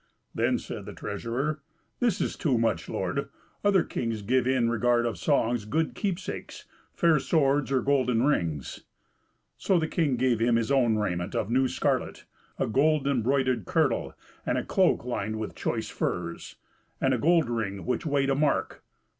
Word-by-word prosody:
Then - - +1
said - - -7
the - - -7
treasurer, 140 +6 -3 0.4
"This 235 -6 +1
is - - -1
too 135 -7 +1
much, 115 -8 0
lord; - - -2 0.3
other 200 -4 +4
kings 115 -3 -3
give 125 +4 +1
in 130 -3 +2
regard 120 +1 +2
of 115 - -1
songs 120 -6 +1
good 155 +8 -1
keepsakes, 195 -2 -4 0.3
fair 165 -3 +3
swords, 140 -1 +1
or 130 -3 +2
golden 125 -4 +2
rings." 85 - -1 0.8
So 190 - +2
the 160 -1 0
king 155 -6 +1
gave 125 -2 +1
him 115 +1 +3
his 115 +2 0
own 125 -5 +3
raiment 90 -3 -2
of 110 - -1
new 130 +2 +3
scarlet, - - -1 0.3
a - - 0
gold 145 +4 +2
embroidered 130 0 +1
kirtle, 160 -9 0 0.3
and - - 0
a - - -2
cloak - - +2
lined 110 -3 -2
with 110 -1 -4
choice - - -3
furs, 85 -1 -4 0.4
and 130 - +2
a 125 - 0
gold 165 +2 +3
ring 110 -5 -3
which 125 -2 -1
weighed 140 -3 +1
a - - +2
mark. 145 0 0
130 Hz, 165 wpm, -27 LUFS, 115-145 Hz, 0.8 s, other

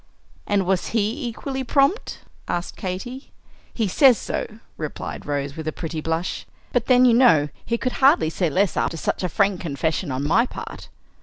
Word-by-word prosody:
"And 200 -2 +1
was 185 0 0
he 225 +6 -1
equally 265 +3 -4
prompt?" 275 - +1 0.3
asked 175 0 -3
Katy. 245 +9 -6 0.4
"He 225 -3 -1
says 250 +5 +5
so," - - -3 0.3
replied 155 -2 -6
Rose, 140 -1 -2
with 160 -1 -6
a - - 0
pretty 160 -1 -5
blush. 165 +3 -3 0.3
"But 245 -2 +1
then, 255 -1 +6
you 245 - +6
know, 230 - +5 0.2
he 235 - 0
could 255 +1 -2
hardly 215 - +5
say 175 0 0
less 190 +5 +1
after 165 - -1
such - - -2
a 180 - -1
frank 200 +1 +1
confession 160 +1 -2
on 130 +2 -2
my 235 +10 +3
part. - - -8
190 Hz, 175 wpm, -23 LUFS, 160-245 Hz, 0.4 s, then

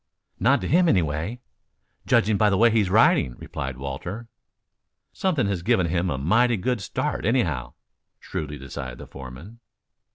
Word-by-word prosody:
"Not - - +3
to 90 - -3
him, 175 +2 +4
anyway, 85 - 0 0.7
judging 105 +2 +3
by 105 +1 +3
the 100 - +1
way 115 +2 +5
he 115 - +3
is 100 -4 +1
riding," 95 - +4
replied 65 -2 -6
Walter. 85 - -6 0.8
"Something 160 - 0
has 100 -3 -1
given 90 0 +2
him 90 +2 0
a 70 - -2
mighty 115 - +2
good 120 +3 -1
start, 95 - -3
anyhow," 85 - 0 0.4
shrewdly 75 -1 -5
decided 65 -2 -7
the - - -9
foreman. 70 - -11
90 Hz, 155 wpm, -24 LUFS, 70-115 Hz, 0.8 s, way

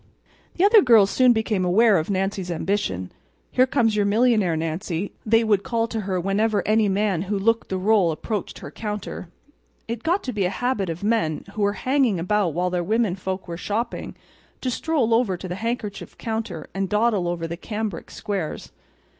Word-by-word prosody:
The 350 - +1
other 420 +1 +7
girls 225 - +5
soon 255 -1 +5
became 220 -4 0
aware 200 +2 +4
of 160 - -4
Nancy's 195 -1 -1
ambition. 165 - -2 0.4
"Here 255 +1 +4
comes 235 -5 +2
your 210 - +2
millionaire, 215 -6 +3
Nancy," 165 +3 -3
they 225 +1 +4
would 210 -3 +2
call 230 -1 -1
to 225 - -3
her 190 -3 -2
whenever 205 +4 0
any 215 -1 +3
man 195 -3 +1
who 205 - 0
looked 230 +3 +1
the 190 - -1
rôle 195 -2 +3
approached 205 +6 -4
her - - -9
counter. 210 -4 -5 0.6
It 230 0 -4
got 350 +8 0
to 255 - -4
be 200 -3 0
a - - +1
habit 215 -4 -1
of 165 +3 -5
men, 205 -8 0
who 215 - -4
were 205 0 +2
hanging 255 -3 +1
about 185 -2 0
while 180 +1 0
their 180 -1 0
women 215 -1 +1
folk 190 0 -5
were 170 -1 -5
shopping, 225 +6 -3 0.5
to 255 - -1
stroll 255 -4 0
over 225 -6 +2
to 185 - -7
the 175 - -4
handkerchief 215 0 -4
counter 220 -8 -4
and 195 -1 -2
dawdle 210 -3 +2
over 175 -1 -2
the 165 +1 -4
cambric 210 0 -5
squares. 195 -7 -4
205 Hz, 190 wpm, -23 LUFS, 185-225 Hz, 0.6 s, other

